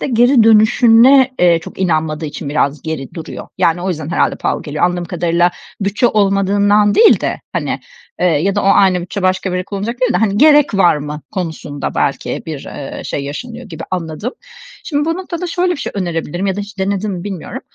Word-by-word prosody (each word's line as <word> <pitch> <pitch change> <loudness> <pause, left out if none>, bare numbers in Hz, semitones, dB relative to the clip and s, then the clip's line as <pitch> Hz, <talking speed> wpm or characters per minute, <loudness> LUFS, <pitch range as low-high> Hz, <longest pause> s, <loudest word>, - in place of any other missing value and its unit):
de - - -2
geri 245 0 +4
dönüşüne, 230 +4 +5
eee, 175 -2 +4
çok - - -11
inanmadığı 160 -3 -1
için 145 0 -6
biraz 145 0 0
geri 155 -5 -5
duruyor. 160 - -8
Yani, 170 +1 +1
o 190 - -2
yüzden 155 -4 -4
herhâlde - - +1
pahalı - - -2
geliyor. 150 +1 -1
Anladığım 175 0 0
kadarıyla 175 0 +1 0.3
bütçe 200 +5 +1
olmadığından 205 0 +2
değil 450 - +6
de, - - -2
hani, - - -2 0.4
eee, 180 - +3
ya 180 +4 +1
da 205 - 0
o - - -3
aynı 190 -2 +4
bütçe 185 +2 -5
başka 185 +1 0
bir 180 - -3
yere 180 - -2
kullanacak 210 +5 -5
değil 250 -2 +2
de, - - +1
hani, 205 0 +1
"Gerek 295 -4 +5
var 175 -5 +4
mı?" 150 +1 -6
konusunda 160 -5 -4
belki - - -1
bir, - - -6
eee, - - -7
şey 140 - -4
yaşanıyor 235 - -7
gibi 165 -4 -8
anladım. 180 - -4 0.5
Şimdi 295 -2 -1
bu 330 - 0
noktada 360 -1 -5
şöyle 355 +1 0
bir - - -4
şey - - -5
önerebilirim 175 -1 -3
ya 195 0 -1
da - - -2
hiç 205 0 -9
denedin 200 +2 -1
mi 175 0 -6
bilmiyorum. 195 -5 -6
190 Hz, 205 wpm, -16 LUFS, 170-225 Hz, 0.5 s, değil